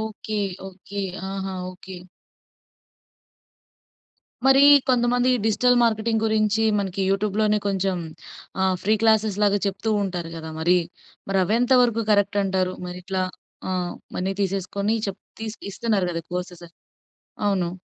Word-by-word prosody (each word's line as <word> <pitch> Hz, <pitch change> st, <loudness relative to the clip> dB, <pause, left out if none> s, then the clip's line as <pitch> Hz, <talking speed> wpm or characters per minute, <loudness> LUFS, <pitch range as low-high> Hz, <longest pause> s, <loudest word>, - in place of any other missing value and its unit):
Okay. 215 Hz, -1 st, -4 dB, 0.3 s
Okay. 195 Hz, +2 st, -8 dB, 0.3 s
ఆహా! 195 Hz, -1 st, -4 dB, 0.2 s
Okay. 185 Hz, 0 st, -11 dB, 2.5 s
మరి 270 Hz, +1 st, +6 dB, 0.3 s
కొంతమందికి 245 Hz, 0 st, +3 dB
డిజిటల్ 245 Hz, +3 st, +3 dB
మార్కెటింగ్ 225 Hz, -1 st, +1 dB
గురించి 215 Hz, 0 st, +2 dB, 0.2 s
మనకి 195 Hz, -1 st, -2 dB
యూట్యూబ్‌లోనే 210 Hz, +1 st, +1 dB
కొంచెం 195 Hz, -1 st, 0 dB, 0.7 s
ఆహ్, 190 Hz, -1 st, +2 dB
ఫ్రీ 215 Hz, +2 st, +3 dB
క్లాసేస్‌లాగా 210 Hz, -2 st, +3 dB
చెప్తూ 200 Hz, +3 st, -2 dB
ఉంటారు 175 Hz, -4 st, -4 dB
గదా! 160 Hz, 0 st, -7 dB
మరి. 180 Hz, +2 st, +4 dB, 0.5 s
మరవేంత 215 Hz, +7 st, +2 dB
వరకు 230 Hz, -2 st, +1 dB
కరెక్ట్ 205 Hz, 0 st, +3 dB
అంటారు? 185 Hz, -1 st, 0 dB
మరిట్లా 180 Hz, +1 st, -3 dB, 0.5 s
ఆహ్, 180 Hz, -1 st, -2 dB, 0.2 s
మనీ 190 Hz, +2 st, -1 dB
తీసేసుకొని 195 Hz, +3 st, -1 dB
చెప్ 195 Hz, -1 st, -5 dB, 0.2 s
తీ 225 Hz, -, -4 dB, 0.3 s
ఇస్తున్నారు 210 Hz, -5 st, 0 dB
గదా! 165 Hz, -1 st, -4 dB
కోర్సెస్. 180 Hz, -1 st, -5 dB, 0.8 s
అవును. 185 Hz, -4 st, +1 dB
200 Hz, 110 wpm, -23 LUFS, 185-220 Hz, 2.5 s, మరి